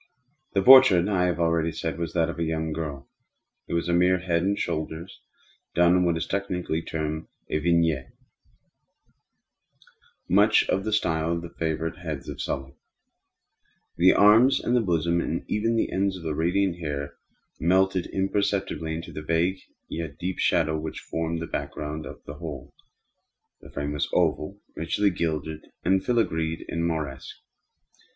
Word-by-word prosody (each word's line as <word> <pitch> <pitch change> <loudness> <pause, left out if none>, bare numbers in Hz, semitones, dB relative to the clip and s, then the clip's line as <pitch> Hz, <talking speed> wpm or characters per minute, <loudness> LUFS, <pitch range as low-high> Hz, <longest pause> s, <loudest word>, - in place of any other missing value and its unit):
The 100 -2 +2
portrait, 125 -9 +8
I 95 -3 +2
have 90 -1 -1
already 85 -1 +1
said, 80 +1 -4
was 85 -1 -3
that 85 -2 +2
of 85 - -6
a - - +1
young 80 -1 -2
girl. 75 -4 -5 0.6
It - - -2
was 85 0 -1
a 85 - +1
mere 90 +1 +4
head 85 -2 0
and 100 +3 0
shoulders, 80 +2 -4 0.5
done 85 +1 +5
in 90 - +3
what 85 -1 +1
is 80 - -2
technically 90 -4 -2
termed 80 -1 -4 0.2
a 75 - +1
vignette 80 -4 +2
manner; - - -25 2.1
much 105 +4 +4
in 95 - +1
the 110 - -3
style 80 -5 +1
of 85 0 -3
the 85 - -8
favorite 80 +2 -3
heads 80 -5 -5
of - - -6
Sully. 65 0 -4 1.2
The 90 +2 +6
arms, 115 +6 +6
the 120 0 +2
bosom, 85 -3 +1
and 85 - -3
even 115 +2 0
the 115 - 0
ends 95 0 0
of 85 - -11
the 80 -2 -2
radiant 90 +3 0
hair 70 -3 -4 0.5
melted 95 +2 +2
imperceptibly 95 -4 -1
into 85 - -7
the 75 - -6
vague 85 +4 0 0.3
yet 80 -3 -5
deep 90 +1 -4
shadow 80 0 +2
which 80 0 -5
formed 80 0 -3
the - - -3
back - - -4
ground 75 +1 -5
of - - -11
the 70 +1 -9
whole. 70 -4 -7 0.9
The - - -14
frame 70 0 -4
was 75 - -1
oval, 95 +7 0 0.2
richly 100 +5 +1
gilded 80 -2 -3 0.2
and 95 +2 +3
filigreed 80 -10 0
in 85 - -3
Moresque. 75 -5 -4
85 Hz, 160 wpm, -26 LUFS, 80-95 Hz, 2.1 s, portrait